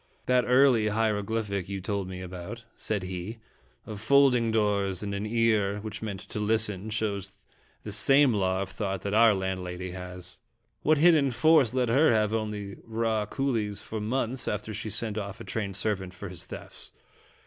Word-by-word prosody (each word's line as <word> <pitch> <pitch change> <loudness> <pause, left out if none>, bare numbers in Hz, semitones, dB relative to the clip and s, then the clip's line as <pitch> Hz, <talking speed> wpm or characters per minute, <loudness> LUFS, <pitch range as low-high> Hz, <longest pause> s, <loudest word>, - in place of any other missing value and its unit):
"That 125 -1 +3
early 125 -3 +5
hieroglyphic 105 -2 -1
you 100 -1 -3
told 100 0 -3
me 95 0 -7
about," 90 +6 -7
said 105 -3 -2
he, 90 +4 -5 0.5
"of 105 -2 -7
folding 125 -1 +4
doors 100 -3 +1
and 100 -1 -3
an 100 +2 -3
ear, 110 -3 +2
which 110 0 -6
meant 100 -4 -5
'to - - -6
listen/ 105 -1 0
shows 100 -3 -3 0.4
the 105 - -6
same 135 +6 +5
law 95 -2 +1
of 95 - -8
thought 95 -1 -3
that 100 - -3
our 110 -1 +6
landlady 95 -1 -4
has. 90 0 -8 0.4
What 155 +1 +3
hid 170 +4 +7
den 145 -4 +3
force 135 -2 +4
let 125 -2 +1
her 140 +6 +5
have 110 -1 +2
only 105 -3 -3
raw 110 -2 -1
coolies 110 -6 -2
for 110 -1 -5
months 125 +2 -2
after 105 +1 -3
she 110 +2 -4
sent 110 0 -1
off 100 -1 -6
a - - -7
trained 100 -4 -3
servant 95 -2 -1
for 100 0 -7
his 90 -2 -6
thefts? - - -9
105 Hz, 175 wpm, -28 LUFS, 100-115 Hz, 0.5 s, hid